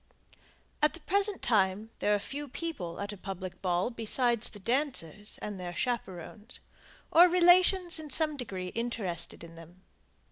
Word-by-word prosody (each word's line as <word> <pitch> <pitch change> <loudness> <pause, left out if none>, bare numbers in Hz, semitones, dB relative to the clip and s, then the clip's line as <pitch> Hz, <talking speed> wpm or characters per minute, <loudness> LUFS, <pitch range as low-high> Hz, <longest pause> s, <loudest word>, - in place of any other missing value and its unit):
At 300 +2 +3
the - - -10
present 400 +5 0
time 210 -1 +2
there 210 - +3
are - - 0
few 285 +7 -5
people 255 - -5
at 200 0 -3
a - - -9
public 190 -1 -6
ball 180 +4 +1
besides 235 0 +1
the - - -11
dancers 210 - -1
and 205 -2 -4
their 175 -1 -5
chaperones, 215 -1 -3 0.5
or 345 +2 +9
relations 355 0 +5
in 310 -1 -8
some 305 +2 0
degree 190 -9 -4
interested 215 -8 -4
in 165 0 -10
them. 165 +3 -14
220 Hz, 150 wpm, -30 LUFS, 185-300 Hz, 0.5 s, or